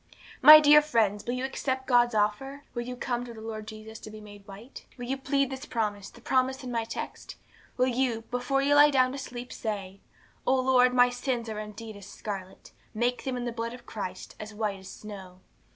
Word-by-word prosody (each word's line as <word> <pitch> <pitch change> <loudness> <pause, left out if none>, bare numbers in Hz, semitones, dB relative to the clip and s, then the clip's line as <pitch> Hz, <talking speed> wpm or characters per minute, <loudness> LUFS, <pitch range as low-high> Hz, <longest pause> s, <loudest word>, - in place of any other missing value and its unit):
'My 305 +1 +12
dear 300 0 +7
friends, 220 -8 +1
will 245 - -2
you 255 +1 -2
accept 265 0 -3
God's 240 -2 +3
offer? 240 +7 -1
Will 240 - -3
you 250 +1 -6
come 245 -1 -2
to 240 -1 -9
the - - -10
Lord 220 -1 -7
Jesus 220 0 -9
to - - -10
be 215 0 -10
made 205 -1 -13
white? 210 +7 -11
Will 245 - -6
you 260 +2 -1
plead 275 0 0
this 265 +2 -7
promise, 205 -4 -2
the 240 - -17
promise 260 +1 0
in 250 - -5
my 230 -1 -1
text? 225 - -7 0.4
Will 255 - +3
you, 250 -2 0
before 250 +3 0
you 285 +1 +3
lie 290 +1 +8
down 255 -3 +3
to 275 - -6
sleep, 245 -2 -7
say 200 -3 -5 0.5
'O 265 - +4
Lord, 255 -1 +4
my 245 0 +5
sins 245 -2 -3
are 215 -1 -4
indeed 215 +1 -8
as 200 0 -11
scarlet, 195 -3 -8 0.2
make 240 +3 -1
them, 260 -2 -2
in 245 - -4
the 240 - -2
blood 230 +1 -4
of 250 - -15
Christ, 185 -4 -7
as 215 0 -8
white 210 -2 -2
as 190 - -11
snow. 190 -3 -10
240 Hz, 215 wpm, -28 LUFS, 215-260 Hz, 0.5 s, My